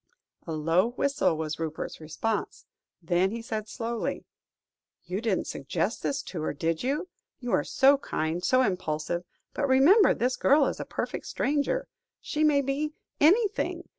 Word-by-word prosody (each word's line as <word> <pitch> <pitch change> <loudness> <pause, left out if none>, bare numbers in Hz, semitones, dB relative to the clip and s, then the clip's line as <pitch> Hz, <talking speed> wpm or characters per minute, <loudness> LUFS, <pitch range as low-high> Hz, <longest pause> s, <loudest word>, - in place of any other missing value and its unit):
A 165 - -3
low 165 +6 +2
whistle 275 - +1
was 155 0 -3
Rupert's 160 0 -4
response, 205 +8 -3 0.4
then 175 +3 +2
he 230 +3 -4
said 220 -2 -4
slowly 230 +1 -3 0.8
"You 180 +3 -4
didn't 220 -5 0
suggest 165 - -2
this 280 - -1
to 170 - -6
her, 155 - -2
did 165 +2 -1
you? 290 +8 -1 0.3
You 245 -2 -4
are - - +3
so 275 +1 +4
kind, 165 - -2
so 255 +3 +4
impulsive, 175 -3 -2 0.3
but, 280 - 0
remember 295 +11 +6
this 250 +2 0
girl 285 +1 +4
is - - -2
a - - -4
perfect - - -4
stranger. 300 - 0 0.3
She 305 - -2
may 295 -2 +4
be 285 +3 -2 0.3
anything. 395 +8 +2
230 Hz, 155 wpm, -27 LUFS, 165-280 Hz, 0.8 s, remember